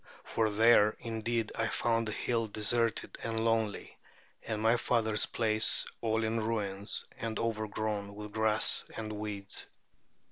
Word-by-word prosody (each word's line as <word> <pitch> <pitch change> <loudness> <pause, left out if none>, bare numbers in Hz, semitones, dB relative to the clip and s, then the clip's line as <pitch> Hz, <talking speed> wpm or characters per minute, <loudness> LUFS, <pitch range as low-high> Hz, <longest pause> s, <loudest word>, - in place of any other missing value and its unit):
For 110 -1 0
there 110 0 +4
indeed 115 -1 -2
I 115 - -1
found 115 0 0
the - - -3
hill 115 +1 -1
deserted 110 +1 0
and 115 0 -2
lonely, 110 -2 -1 0.4
and 110 -2 -4
my 110 +2 +3
father's 110 -3 0
palace 110 -1 +4 0.2
all 110 0 0
in 110 +1 -1
ruins 105 -2 -3
and 115 -1 -4
overgrown 110 -2 -3
with 105 0 -8
grass 110 0 +4
and 110 -1 -5
weeds. 105 -2 -5
110 Hz, 135 wpm, -31 LUFS, 105-115 Hz, 0.4 s, there